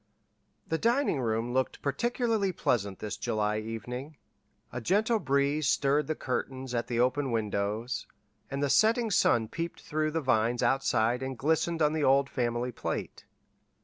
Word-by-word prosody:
The 160 Hz, -, -1 dB
dining 235 Hz, -, +2 dB
room 115 Hz, +1 st, -1 dB
looked 130 Hz, 0 st, -1 dB
particularly 220 Hz, -, 0 dB
pleasant 100 Hz, -, -1 dB
this 105 Hz, -, -5 dB
July 105 Hz, 0 st, 0 dB
evening. 125 Hz, +6 st, -6 dB, 0.6 s
A 120 Hz, -, -4 dB
gentle 215 Hz, -, +2 dB
breeze 140 Hz, -1 st, +1 dB
stirred 145 Hz, +2 st, +2 dB
the 155 Hz, -, -1 dB
curtains 130 Hz, -1 st, -4 dB
at 120 Hz, -1 st, -1 dB
the 120 Hz, -1 st, -1 dB
open 130 Hz, +3 st, +2 dB
windows, 110 Hz, +1 st, -2 dB, 0.4 s
and 140 Hz, +1 st, -2 dB
the 140 Hz, -, +1 dB
setting 225 Hz, +1 st, +3 dB
sun 115 Hz, -, +3 dB
peeped 165 Hz, +8 st, -5 dB
through 155 Hz, 0 st, -1 dB
the 160 Hz, +1 st, -1 dB
vines 120 Hz, -2 st, +1 dB
outside 125 Hz, -2 st, +2 dB
and 130 Hz, -1 st, -4 dB
glistened 160 Hz, +4 st, +1 dB
on 150 Hz, 0 st, +3 dB
the 155 Hz, -2 st, 0 dB
old 140 Hz, 0 st, +3 dB
family 120 Hz, 0 st, -1 dB
plate. -, -, -5 dB
135 Hz, 150 wpm, -29 LUFS, 120-155 Hz, 0.6 s, setting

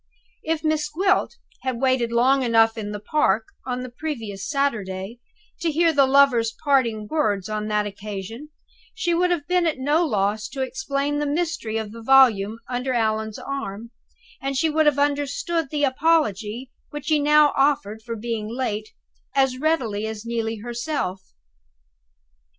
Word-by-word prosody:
If 320 Hz, 0 st, -2 dB
Miss 310 Hz, -1 st, 0 dB
Gwilt 375 Hz, +8 st, +1 dB, 0.3 s
had 260 Hz, -3 st, -2 dB
waited 255 Hz, -3 st, +1 dB
long 260 Hz, +4 st, +3 dB
enough 225 Hz, -2 st, +4 dB
in 210 Hz, -2 st, -5 dB
the 210 Hz, -, -5 dB
park, 220 Hz, -2 st, +1 dB, 0.2 s
on 250 Hz, 0 st, -2 dB
the 255 Hz, -, -8 dB
previous 230 Hz, -9 st, -5 dB
Saturday, 220 Hz, -7 st, -2 dB, 0.4 s
to 335 Hz, 0 st, 0 dB
hear 330 Hz, +1 st, +3 dB
the 280 Hz, -2 st, +4 dB
lovers' 260 Hz, -5 st, +4 dB
parting 235 Hz, -7 st, +2 dB
words 210 Hz, -10 st, 0 dB
on 215 Hz, 0 st, -3 dB
that 210 Hz, -1 st, +1 dB
occasion, 205 Hz, +6 st, -7 dB, 0.5 s
she 355 Hz, -6 st, 0 dB
would 360 Hz, +1 st, +2 dB
have 335 Hz, -5 st, -1 dB
been 360 Hz, -1 st, +2 dB
at 315 Hz, -, 0 dB
no 295 Hz, +6 st, +2 dB
loss 215 Hz, -, 0 dB
to 265 Hz, 0 st, -3 dB
explain 285 Hz, -1 st, -2 dB
the 295 Hz, -, -1 dB
mystery 300 Hz, -8 st, -1 dB
of 220 Hz, -2 st, -4 dB
the 230 Hz, +1 st, -10 dB
volume 225 Hz, -5 st, +5 dB
under 250 Hz, +1 st, -2 dB
Allan's 220 Hz, -2 st, 0 dB
arm, 235 Hz, -5 st, -6 dB, 0.5 s
and 275 Hz, 0 st, -2 dB
she 320 Hz, +3 st, +2 dB
would 310 Hz, 0 st, +3 dB
have 290 Hz, -2 st, +3 dB
understood 290 Hz, -, 0 dB
the 295 Hz, 0 st, -1 dB
apology 260 Hz, -, +1 dB, 0.2 s
which 295 Hz, +1 st, -6 dB
he 305 Hz, -1 st, +4 dB
now 300 Hz, 0 st, +5 dB
offered 275 Hz, -6 st, +1 dB
for 230 Hz, +1 st, -5 dB
being 225 Hz, -1 st, -4 dB
late 220 Hz, -3 st, -3 dB, 0.5 s
as 265 Hz, -2 st, +2 dB
readily 240 Hz, -9 st, 0 dB
as 220 Hz, 0 st, -6 dB
Neelie 225 Hz, -2 st, -2 dB
herself. 240 Hz, -5 st, -3 dB
260 Hz, 155 wpm, -23 LUFS, 220-295 Hz, 0.5 s, volume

